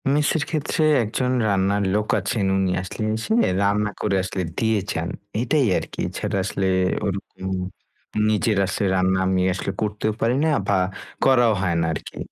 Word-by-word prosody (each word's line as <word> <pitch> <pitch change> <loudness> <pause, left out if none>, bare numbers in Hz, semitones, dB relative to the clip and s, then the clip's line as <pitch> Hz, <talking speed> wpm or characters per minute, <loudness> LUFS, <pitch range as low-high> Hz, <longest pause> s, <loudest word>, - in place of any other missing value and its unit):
Mace 150 +1 +2
এর 150 - 0
ক্ষেত্রে 155 0 -1 0.2
একজন 125 +4 -1 0.2
রান্নার 100 0 +1
লোক 105 0 0
আছেন, 100 +1 -1
উনি 95 -1 +1
আসলে 95 +3 -5
এসে 110 - -2 0.3
রান্না 105 +1 +2
করে 105 -2 +1
আসলে 95 0 -3
দিয়ে 110 -2 +2
যান 80 +1 -2 0.3
এটাই 135 +4 +2
আরকি। - - -6
এছাড়া - - -3
আসলে 95 0 -2 0.4
ওর 100 -2 0 0.3
উম 95 0 -2 0.7
নিজের 110 0 +1
আসলে 95 +2 -1
রান্না 95 0 +2
আমি 95 -1 +2
আসলে 95 +1 -3
করতেও 105 0 -1
পারি 115 +2 +2
না - - +3 0.2
বা 100 - +2 0.5
করাও 120 -4 +5
হয় 90 -3 0
না - - +1
আরকি। - - -7
105 Hz, 165 wpm, -23 LUFS, 95-115 Hz, 0.7 s, করাও